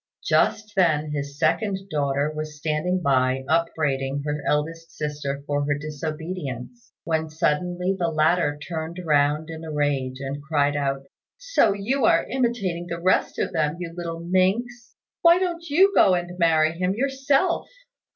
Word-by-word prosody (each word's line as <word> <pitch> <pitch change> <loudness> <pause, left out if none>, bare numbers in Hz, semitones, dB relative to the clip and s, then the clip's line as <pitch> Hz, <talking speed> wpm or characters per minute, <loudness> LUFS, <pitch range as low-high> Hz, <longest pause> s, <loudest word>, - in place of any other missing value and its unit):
Just 215 -1 +1
then 155 -5 +2
his 140 -1 -4
second 200 +4 +1
daughter 145 0 0
was 155 0 -5
standing 160 +5 -1
by 130 -1 +2
upbraiding 145 -4 0
her 150 0 -2
elder 150 +2 +1
sister 150 -4 -5
for 145 0 0
her 145 -1 +1
disobedience, 155 - -6
when 160 -1 -1
suddenly 175 +4 0
the 175 -2 -1
latter 155 -1 +2
turned 160 +2 -5
round 150 +1 +2
in 160 0 -8
a 160 - -6
rage, 140 -3 -1
and 140 +1 -5
cried 145 -1 +1
out, 135 -1 -1 0.3
"So - - +2
you 235 +7 -1
are - - +4
imitating 220 -9 -1
the 170 0 -4
rest 185 +2 +1
of - - -2
them, 155 -1 0
you 170 -2 -6
little 170 -1 -5
minx; 200 +7 0 0.3
why 340 0 +7
don't 340 -3 -2
you 380 +7 +5
go 185 - +5
and 175 0 -3
marry 160 -2 +4
him 180 +3 -1
yourself?" 275 - +1
160 Hz, 150 wpm, -24 LUFS, 145-185 Hz, 0.3 s, why